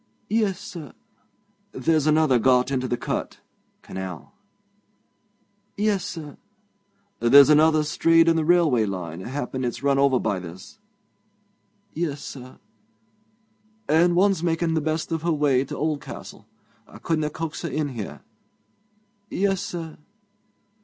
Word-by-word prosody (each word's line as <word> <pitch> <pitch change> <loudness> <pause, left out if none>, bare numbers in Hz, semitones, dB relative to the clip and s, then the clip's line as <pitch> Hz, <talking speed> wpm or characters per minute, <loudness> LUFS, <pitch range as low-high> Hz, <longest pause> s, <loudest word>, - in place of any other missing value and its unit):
'Yes, 210 -4 +1
sir.' 160 -5 -9 0.8
'There's 155 +3 +1
another 155 -5 +4
got 125 +2 +3
into 130 -1 -1
th' 120 -1 -2
cut - - -4 0.4
[canal].' 95 -5 -7 1.4
'Yes, 205 -3 +1
sir.' 155 -4 -7 0.8
'There's 140 +5 +7
another 155 +1 +5
strayed 165 +2 +3
on 165 - +4
the 160 - +1
railway 155 -9 +3
line 90 -4 -5
happen 130 +4 -4
it's 125 +2 -4
run 140 -1 +2
over 140 -2 +4
by 100 - -1
this.' 90 +2 -11 1.1
'Yes, 155 -3 -3
sir.' 130 -2 -10 1.3
'And 170 +3 +3
one's 190 -1 +3
making 165 -1 0
the 160 - +1
best 155 +2 -2
of 160 -1 -1
her 170 +1 0
way 145 -4 +2
to - - -7
Oldcastle. 155 -2 -5 0.4
I - - -13
couldna 155 -2 -1
coax 160 +1 -5
her 170 - -3
in 145 +1 -2
here.' 115 -6 -7 1.1
'Yes, 195 -1 0
sir.' 165 -3 -6
150 Hz, 125 wpm, -24 LUFS, 130-165 Hz, 1.4 s, There's